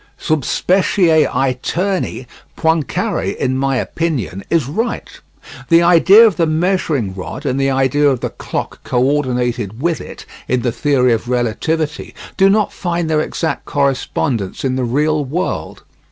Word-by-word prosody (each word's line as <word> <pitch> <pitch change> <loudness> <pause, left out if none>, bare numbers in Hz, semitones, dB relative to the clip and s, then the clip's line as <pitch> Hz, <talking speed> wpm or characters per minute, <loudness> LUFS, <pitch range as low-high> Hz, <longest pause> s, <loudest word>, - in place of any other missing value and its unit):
Sub 155 -3 -1
specie 175 - +2
aeterni 135 +4 -1 0.3
Poincare, 160 -6 0
in 130 - -1
my 135 0 0
opinion, 125 - -2
is 165 -5 +2
right. 225 - -4 0.5
The 170 0 +5
idea 185 +6 +7
of 205 -8 +2
the 165 - +2
measuring 155 - 0
rod 100 - -7
and 135 0 0
the 135 - +2
idea 135 +2 +2
of 130 -3 0
the - - -4
clock - - -5
co 125 - -1
ordinated 125 -5 0
with 165 +2 -1
it - - -10 0.2
in 125 -2 0
the 120 - +1
theory 125 -2 +2
of 115 +2 -3
relativity 150 +6 -2 0.2
do 195 0 +4
not 210 +1 +2
find 170 -2 -2
their 155 -1 +2
exact 160 +1 -3
correspondence 135 -6 -1
in 130 -1 0
the 130 - -1
real 150 +5 +1
world. 155 +7 -4
145 Hz, 150 wpm, -17 LUFS, 125-165 Hz, 0.5 s, idea